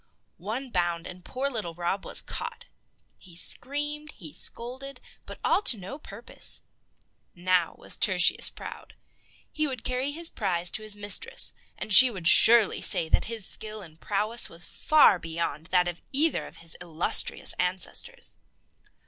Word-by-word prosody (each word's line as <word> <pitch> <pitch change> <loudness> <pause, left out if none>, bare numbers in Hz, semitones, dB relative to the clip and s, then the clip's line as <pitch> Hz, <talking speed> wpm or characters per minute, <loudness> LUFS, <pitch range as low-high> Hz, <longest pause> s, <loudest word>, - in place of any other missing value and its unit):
One 235 +8 -5
bound, 175 -3 -1
and 180 0 -10
poor 260 +8 -3
little 215 -11 -5
Rob 175 +3 -3
was - - 0
caught. - - -6 0.5
He 175 -3 -15
screamed, 295 - -1
he 160 -8 -11
scolded, 260 +4 -4 0.3
but - - -10
all - - +2
to 330 - +6
no 205 +10 -8
purpose. - - -5 0.7
Now 180 -1 +1
was - - -4
Tertius 185 -4 +3
proud. - - -10 0.6
He 310 0 0
would 255 -5 -6
carry 255 +3 -1
his 330 +3 0
prize 180 -4 -2
to - - -4
his 215 -1 -1
mistress, 205 0 -1 0.2
and 210 - -2
she 255 +5 +11
would 185 -7 -5
surely 225 +2 +7
say 160 - 0
that - - +2
his 225 -3 -5
skill 215 0 -1
and 160 -2 -16
prowess 215 +4 0
was 165 +1 -8
far 300 - +4
beyond 165 -2 -4
that 180 -1 +2
of 175 -1 -5
either 305 +4 +1
of - - -15
his 165 0 -4
illustrious 170 -1 0
ancestors. 185 - -2
205 Hz, 155 wpm, -27 LUFS, 175-255 Hz, 0.7 s, she